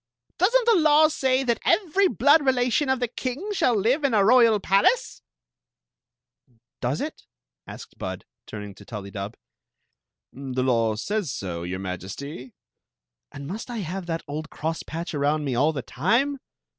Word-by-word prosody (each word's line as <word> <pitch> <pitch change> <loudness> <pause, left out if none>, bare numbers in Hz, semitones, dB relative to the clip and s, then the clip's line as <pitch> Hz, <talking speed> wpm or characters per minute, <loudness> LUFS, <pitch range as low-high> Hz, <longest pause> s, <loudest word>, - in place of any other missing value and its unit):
Does 370 +5 +4
n't - - -4
the 465 -1 +5
law 310 0 +5
say 265 -3 +1
that 235 -3 0
every 390 0 +3
blood 285 - +4
relation 260 +1 +2
of 265 -1 +1
the 245 - 0
king 265 - -4
shall 250 - +2
live 240 +9 +1
in 270 -5 +2
a 200 -2 +4
royal 230 -2 +5
palace? 200 - +2 0.7
" 120 -2 -41
"Does - - -1
it?" - - -6 0.4
asked - - -11
Bud - - -5 0.2
turning 105 -1 -7
to - - -15
TuUydub. 100 -1 -7 1.0
"The 130 -1 -3
law 115 -4 +2
says 195 - -2
so, 90 -6 -5
your 90 +2 -4
Majesty." 95 - -7 0.8
"And 140 - -8
must 210 - -6
I 240 - -4
have 180 +2 -5
that 165 -1 -3
old 155 +3 -5
crosspatch 165 +2 -4
around 145 +1 0
me 135 - -1
all 145 +6 +3
the 135 -5 -5
time?" 245 - 0
190 Hz, 155 wpm, -25 LUFS, -, 1.0 s, the